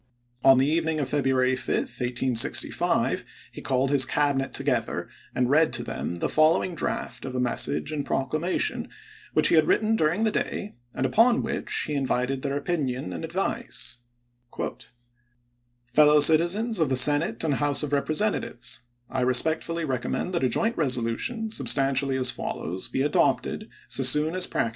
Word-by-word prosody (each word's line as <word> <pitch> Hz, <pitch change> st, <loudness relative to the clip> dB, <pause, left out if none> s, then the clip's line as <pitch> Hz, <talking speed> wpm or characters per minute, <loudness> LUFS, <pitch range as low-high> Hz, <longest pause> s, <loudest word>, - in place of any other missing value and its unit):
On 135 Hz, -1 st, +7 dB
the 130 Hz, -, +3 dB
evening 160 Hz, +1 st, 0 dB
of 135 Hz, -3 st, -2 dB
February 130 Hz, -2 st, +1 dB
5, 130 Hz, -, -2 dB
1865, 125 Hz, -1 st, 0 dB, 0.3 s
he -, -, -10 dB
called 130 Hz, +1 st, 0 dB
his 140 Hz, -2 st, +6 dB
Cabinet 135 Hz, 0 st, 0 dB
together -, -, -2 dB, 0.3 s
and 125 Hz, -1 st, +1 dB
read 155 Hz, +4 st, +3 dB
to -, -, 0 dB
them 85 Hz, -, -5 dB
the 85 Hz, -, -2 dB
following 160 Hz, +3 st, +2 dB
draft 165 Hz, -, -4 dB
of 130 Hz, -1 st, -6 dB
a -, -, -1 dB
message 125 Hz, +4 st, -1 dB
and 150 Hz, -2 st, -3 dB
proclamation, 155 Hz, +7 st, -2 dB, 0.4 s
which 155 Hz, 0 st, +3 dB
he -, -, +3 dB
had 155 Hz, -1 st, +4 dB
written 220 Hz, +1 st, +2 dB
during 170 Hz, +3 st, +1 dB
the 220 Hz, -, +1 dB
day, 210 Hz, 0 st, -3 dB, 0.2 s
and 130 Hz, -, -1 dB
upon 230 Hz, -, +3 dB
which -, -, -1 dB
he 150 Hz, -, -4 dB
invited 135 Hz, -1 st, -1 dB
their 140 Hz, 0 st, -2 dB
opinion 135 Hz, -, -3 dB
and 85 Hz, -, -6 dB
advice: -, -, -3 dB, 1.9 s
Fellow 150 Hz, +4 st, +4 dB
citizens 175 Hz, +9 st, +4 dB
of 160 Hz, -4 st, +1 dB
the 130 Hz, -, +1 dB
Senate 145 Hz, +6 st, +4 dB
and 155 Hz, -3 st, 0 dB
House 145 Hz, +1 st, +1 dB
of 145 Hz, -1 st, -4 dB
Represent 155 Hz, +9 st, 0 dB
atives: 120 Hz, -, -4 dB, 0.3 s
I 130 Hz, 0 st, -3 dB
respectfully 160 Hz, +6 st, 0 dB
recommend 135 Hz, +6 st, -3 dB
that 170 Hz, -, -1 dB
a 130 Hz, -, +2 dB
joint 225 Hz, -, 0 dB
resolution, 145 Hz, -, -1 dB
substantially 135 Hz, -, +2 dB
as 130 Hz, -, +2 dB
follows, 90 Hz, +4 st, -4 dB
be 135 Hz, -, -2 dB
adopted, 145 Hz, -, 0 dB, 0.2 s
so -, -, -3 dB
soon 150 Hz, +5 st, +4 dB
as 185 Hz, 0 st, +2 dB
practi -, -, -1 dB
Feb. 115 Hz, -, -2 dB
145 Hz, 160 wpm, -25 LUFS, 130-160 Hz, 1.9 s, On